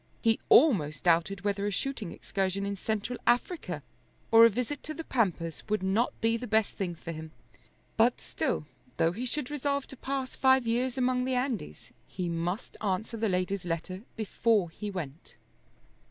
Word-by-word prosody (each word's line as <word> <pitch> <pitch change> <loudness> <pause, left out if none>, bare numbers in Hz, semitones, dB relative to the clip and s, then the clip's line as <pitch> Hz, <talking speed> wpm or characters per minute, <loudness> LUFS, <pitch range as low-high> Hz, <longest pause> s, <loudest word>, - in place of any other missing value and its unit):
He 225 -1 +2
almost 165 - +5
doubted 175 +3 +2
whether 200 0 0
a - - +2
shooting 210 -2 -3
excursion 195 0 -2
in 200 0 -2
Central 220 +4 -2
Africa 245 +8 +1 0.5
or 225 0 +9
a - - +7
visit 250 +6 -3
to 310 - -6
the 325 - -5
Pampas 180 - 0
would 215 -2 +1
not 200 +6 +1
be 230 0 +2
the 245 +1 -6
best 220 -1 +2
thing 180 -3 -3
for 165 +1 -7
him. 160 0 -7 0.7
But - - +4
still, 75 - -2 0.3
though 165 - +3
he 235 +8 -4
should 295 +1 -3
resolve 280 -1 -1
to - - -8
pass 265 0 -3
five 265 -1 +4
years 245 +3 0
among 255 0 +2
the 260 0 0
Andes, 250 - -3 0.2
he 180 -2 -3
must 170 +6 -3
answer 210 +3 -1
the 220 -1 0
lady's 185 +1 0
letter 175 +2 -3
before 220 -4 +1
he 210 +5 -5
went. 165 -6 -7
215 Hz, 170 wpm, -29 LUFS, 180-250 Hz, 0.7 s, or